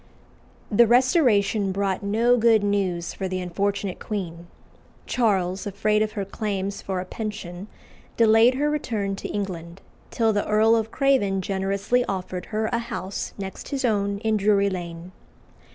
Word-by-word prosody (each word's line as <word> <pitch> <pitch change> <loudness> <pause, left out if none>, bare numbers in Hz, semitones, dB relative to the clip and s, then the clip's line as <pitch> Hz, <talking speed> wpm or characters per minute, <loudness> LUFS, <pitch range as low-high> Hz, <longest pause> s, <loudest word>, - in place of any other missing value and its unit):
The 235 +3 +5
Restoration 235 - +3
brought 195 -1 -1
no 225 +5 +3
good 225 -3 +4
news 190 -4 -1
for 190 - -4
the 185 0 -3
unfortunate 195 +2 -2
queen. 175 -5 -5 0.6
Charles, 195 -5 0
afraid 210 +2 +1
of 215 0 -1
her 200 -3 -3
claims 200 -1 -3
for 190 -1 -3
a 180 - -4
pension, 190 -2 -6 0.5
delayed 225 +2 +5
her 290 +3 +1
return 215 -9 -2
to - - -5
England, 180 -3 -5 0.3
till 225 -2 +1
the 205 - -1
Earl 220 +2 +4
of 225 -1 0
Craven 225 -9 +1
generously 200 +5 0
offered 185 -2 -4
her 220 0 -1
a 235 - +2
house 230 -5 -5
next 195 -1 -7
his 275 -2 -1
own 200 -3 +1
in 220 -1 +1
Drury 200 -1 +3
Lane. 170 -1 -6
200 Hz, 150 wpm, -24 LUFS, 190-225 Hz, 0.6 s, The